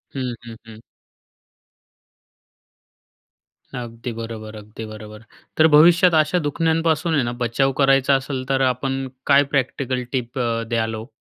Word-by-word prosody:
हं, 130 -2 -3
हं, 115 - -9
हं. 110 -1 -12 3.0
अगदी 120 0 -6
बरोबर, 110 -1 -7
अगदी 105 +1 -9
बरोबर. 105 0 -10 0.4
तर 160 - +7
भविष्यात 170 +3 +6
अशा 155 +4 +1
दुखन्यांपासून 160 +1 0
आहे 140 - +2
ना, 120 - -2
बचाव 120 +3 +1
करायचा 135 0 +4
असेल 135 -1 -3
तर 135 0 +1
आपण 135 +1 -2 0.2
काय 140 0 +6
प्रॅक्टिकल 130 -1 -1
टिप 125 -1 -3 0.3
द्याल 115 -1 -1
हो? 110 +1 -8
130 Hz, 125 wpm, -21 LUFS, 115-145 Hz, 3.0 s, तर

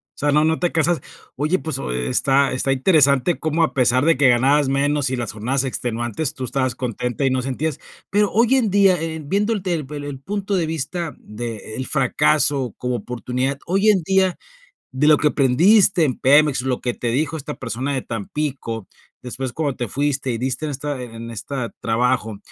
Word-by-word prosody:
o - - -57
sea, 145 0 +1
no 150 +1 +4
no 160 0 +1
te 175 - 0
casas. 165 +1 +1 0.3
Oye, 155 +7 +1
pues, 160 - -3
oh 60 - -4
está 130 - +1
está 130 +1 0
interesante 140 +1 +3
cómo, 160 +1 +1
a 160 - 0
pesar 130 +1 +2
de 165 -3 +4
que 135 -1 +5
ganabas 135 +4 +3
menos 140 0 +1
y 130 - -1
las 120 -2 -3
jornadas 125 +6 -1
extenuantes, 120 +1 -3
tú 130 - -6
estabas 130 -1 -1
contenta 125 +1 -3
y 135 - +2
no 130 0 0
sentías. 135 +3 -3 0.3
Pero 205 0 +2
hoy 235 +4 +3
en 245 -5 +2
día, 195 -3 +4
eh, 160 -1 -4
viendo 205 +9 0
el 205 -4 -4
tel 170 -6 -2
el 145 -1 -6
el 145 -2 -6
punto 200 +6 -3
de 175 -3 +1
vista 160 +1 -4
de 110 0 -7
el 130 - -3
fracaso 140 -2 +2
como 125 0 -2
oportunidad, 125 +4 -3
hoy 195 +4 +2
en 200 -4 +4
día, 190 +1 +2 0.5
de 135 +3 +1
lo 155 -1 +7
que 150 - +2
aprendiste 170 - +4
en 135 -5 0
Pemex, 145 0 +4
lo 130 -1 -2
que 120 - -1
te 120 - -5
dijo 155 +6 -1
esta 150 0 -6
persona 125 +3 -3
de 130 - -1
Tampico, 115 -1 -4 0.3
después 125 0 -5
cuando 145 -4 -2
te 120 - -3
fuiste 135 +2 -1
y 115 - -2
diste 130 +5 -2
en 150 - -3
esta 140 -1 -4
en 115 -1 -8
esta 120 +2 -4
trabajo, 115 -2 0
140 Hz, 200 wpm, -21 LUFS, 125-160 Hz, 0.5 s, lo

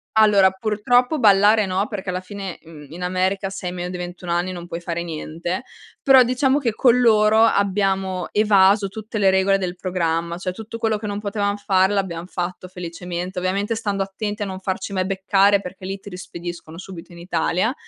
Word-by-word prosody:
Allora, 210 -3 +6
purtroppo 230 - +1
ballare 210 -1 +5
no 190 +2 -1
perché 195 -3 -5
alla 180 0 -2
fine, 190 -1 -7
mhmm, 155 -3 -13
in 175 +3 -7
America 185 +2 0
se 190 -1 -6
hai - - -2
meno 180 0 -5
di 180 - -5
21 180 0 -6
anni 175 +2 0
non 175 -1 -8
puoi 170 0 -6
fare 170 0 -3
niente, 170 +4 -4 0.4
però 265 -2 +7
diciamo 255 +3 +2
che 245 -6 -1
con 245 +2 +4
loro 220 -2 +5
abbiamo 195 -3 +1
evaso 200 -1 +4
tutte 220 +2 -7
le 195 -1 +4
regole 190 +1 +3
del 180 -2 -3
programma, 170 -2 -2
cioè 185 0 -3
tutto 220 +4 -8
quello 225 -1 0
che 210 0 -6
non 205 0 -3
potevam 205 -1 -1
fare, 190 -1 +2
l'abbiam 180 -4 -2
fatto 180 0 -5
felicemente, 180 0 -6
ovviamente 200 +4 -1
stando 205 -3 -1
attenti 205 +2 -5
a - - 0
non 190 -1 -6
farci 190 +1 -4
mai 185 -1 0
beccare 195 +1 +3
perché 185 0 -9
lì 195 +1 -4
ti 205 - -11
rispediscono 175 -3 -8
subito 185 -2 -10
in 170 - -12
Italia, 175 +5 0
190 Hz, 190 wpm, -21 LUFS, 180-210 Hz, 0.4 s, però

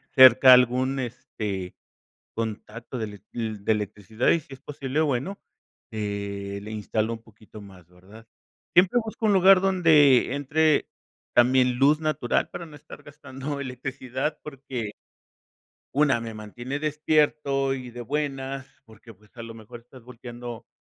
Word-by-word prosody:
cerca 130 -1 +9
algún, 125 +2 +2
este, 105 -6 -5 0.6
contacto 115 +2 -5
de 110 - -2 0.3
ele 110 -3 -4
de 110 - +2
electricidad, 105 +2 -2
y 170 - +3
si 140 - -18
es 135 - -16
posible, 140 0 -3
bueno, 150 +7 -2 0.5
eh, 100 -1 -4
le 105 - -8
instalo 110 +1 -2
un 115 - -7
poquito 110 -1 -15
más, 95 -4 -15
¿verdad? 95 +6 -17 0.5
Siempre 180 +7 +5
busco 220 0 -3
un 210 - +4
lugar 190 0 +7
donde 160 -9 +4
entre 150 +2 +1 0.4
también 125 +1 +4
luz 145 +3 +4
natural, 155 -6 0
para 175 -1 -7
no 155 - -14
estar 145 - -13
gastando 140 -1 -7
electricidad 130 +2 -4
porque 130 -7 -6 1.0
una, 145 -4 +3
me 115 -1 -7
mantiene 120 +6 -6
despierto 150 -2 +1
y 130 -2 -6
de 120 +1 -8
buenas, 135 0 -3 0.2
porque 110 0 -16
pues 105 +2 -25
a - - -6
lo 115 0 -9
mejor 115 +2 -12
estás 125 +1 -17
volteando, 120 -1 -9
125 Hz, 140 wpm, -25 LUFS, 110-145 Hz, 1.0 s, cerca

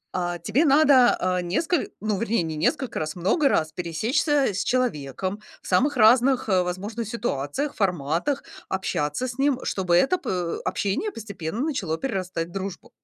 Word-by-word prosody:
Э, 175 -1 -1
тебе 255 +10 +2
надо, 280 -4 +5
э, 180 0 0
несколь 315 - 0
ну, 210 -2 -1
вернее, 230 -3 0
не 160 -1 -4
несколько 260 - -1
раз, 155 0 -3
много 235 - +2
раз 155 -1 +1
пересечься 220 - 0
с - - -1
человеком 200 - -1 0.2
в - - -11
самых 265 +10 +2
разных, 245 +3 +5
э, 185 -1 +4
возможных 200 +6 -4
ситуациях, 230 - -2
форматах, 180 - 0 0.3
общаться 190 - -1
с 245 +2 -7
ним, 275 -2 +2
чтобы 180 -3 0
это 270 - +3
по 175 -2 -2
общение 205 - -1
постепенно 205 - -5
начало 230 - -1
перерастать 185 -8 -3
в - - -15
дружбу. 195 0 -6
200 Hz, 155 wpm, -24 LUFS, 175-260 Hz, 0.3 s, надо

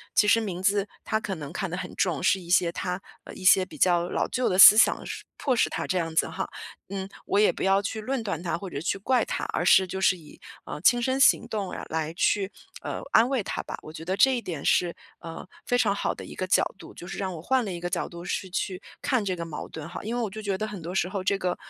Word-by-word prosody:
其 210 - +5
实 230 +2 +5
名 185 -5 -4
字 200 +1 +2 0.2
他 220 - +1
可 195 -3 -4
能 150 -2 -8
看 190 0 -3
得 180 - -4
很 - - -6
重， 175 -6 0
是 195 - +3
一 170 - -12
些 175 -1 +3
他， 180 +1 -3 0.2
呃 - - -10
一 - - -10
些 190 0 +6
比 - - -13
较 175 -1 +3
老 - - 0
旧 255 -1 0
的 185 - 0
思 210 +2 +11
想， 225 - +4
是 - - -6
迫 265 -3 0
使 - - +2
他 - - -3
这 185 - 0
样 165 -2 -2
子 - - +3
哈。 - - -4 0.4
嗯， 190 -1 -4 0.2
我 200 - +1
也 210 - +5
不 - - -5
要 195 +1 +3
去 220 +2 -4
论 260 +3 -2
断 180 -6 -3
他 170 - -1
或 190 +2 -7
者 140 - -5
去 185 +4 -1
怪 250 +6 +1
他， - - -3
而 - - 0
是 190 - +6
就 190 +1 -5
是 185 -1 +4
以， 155 -3 -16 0.2
呃， 150 - -7
亲 240 +6 +4
身 260 +2 0
行 - - +5
动 205 -4 -3 0.2
来 160 0 -2
去， 195 +2 +1 0.3
呃， - - -4
安 230 +3 +5
慰 265 -5 0
他 - - -3
吧， - - -6
我 155 - -10
觉 160 - -8
得 185 +3 -2
这 265 +3 +5
一 240 - -2
点 165 -9 -6
是， 175 -1 +2 0.3
呃， 165 +2 -8 0.2
非 245 - +2
常 220 -5 +2
好 - - -1
的 - - -9
一 - - -10
个 185 - -3
角 185 - +4 0.2
度， - - -11
就 - - -9
是 - - -6
让 190 -2 -2
我 160 - -8
换 260 +5 +2
了 200 - -4
一 175 - -5
个 175 +1 -3
角 - - -2
度 170 0 -9
是 185 +1 -3
去 185 0 -3 0.2
看 255 -5 +1
这 190 -2 -1
个 170 -1 -5
矛 160 -2 -6
盾 160 0 -8
哈。 175 - -7
因 225 +3 -3
为 245 - -1
我 - - 0
就 215 +2 -7
觉 200 -2 -2
得 215 - -3
很 205 -4 -7
多 170 +2 -6
时 180 - +1
候 185 0 -4
这 195 +1 +1
个， 180 -2 -1
190 Hz, 305 characters per minute, -26 LUFS, 175-210 Hz, 0.4 s, 思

